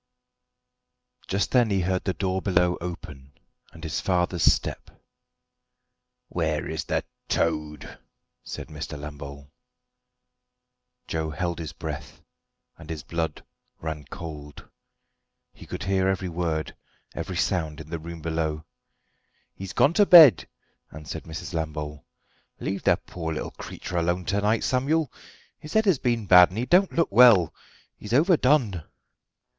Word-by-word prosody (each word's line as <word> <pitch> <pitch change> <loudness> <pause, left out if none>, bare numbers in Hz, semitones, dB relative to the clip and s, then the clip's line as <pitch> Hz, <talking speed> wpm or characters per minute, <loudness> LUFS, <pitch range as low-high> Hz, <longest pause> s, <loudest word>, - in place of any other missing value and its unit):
Just 100 +2 -1
then 120 -3 +4
he 100 -2 +1
heard 95 +1 -1
the 95 - -1
door 95 +2 -1
below 90 -2 +2
open, 70 -6 -8 0.4
and 80 - -14
his 80 - -3
father's 90 -2 0
step. - - +1 1.4
"Where - - -2
is - - -4
the - - -1 0.3
toad?" 75 -2 -2 0.4
said - - -7
Mr. 75 0 -6
Lambole. 70 -1 -9 1.6
Joe 80 -1 -2
held 85 +1 -3
his 80 -2 -5
breath, - - -7 0.6
and 80 -2 -12
his 80 -3 -5
blood 80 -2 -4 0.3
ran 80 -2 -5
cold. 75 -4 -9 0.9
He - - -14
could - - -5
hear 95 0 +1
every 95 -1 -1
word, 80 -2 -2 0.4
every - - -5
sound 80 -3 -1
in 80 +1 -10
the 85 - -3
room 85 +1 -8
below. 80 -1 -2 0.9
"He's 95 -1 -7
gone 145 - +3
to 205 +3 +5
bed," 160 -8 +9 0.4
answered 80 +1 -8
Mrs. 85 +3 -7
Lambole. 75 -2 -4 0.6
"Leave 95 0 -3
the - - +3
poor 80 -2 -6
little - - -4
creetur 90 - -7
alone 85 +1 0
to 100 +1 0
night, 110 +2 +1
Samuel; 140 +3 0 0.5
his 155 - -10
head 220 0 +3
has 185 -10 +3
been 120 -3 0
bad, 90 -2 +8
and 95 - -9
he 120 - -1
don't 180 +8 +4
look 165 -8 +1
well. 110 -7 +6 0.4
He's 105 +2 -7
overdone." 140 - +3
85 Hz, 135 wpm, -25 LUFS, 80-100 Hz, 1.6 s, bed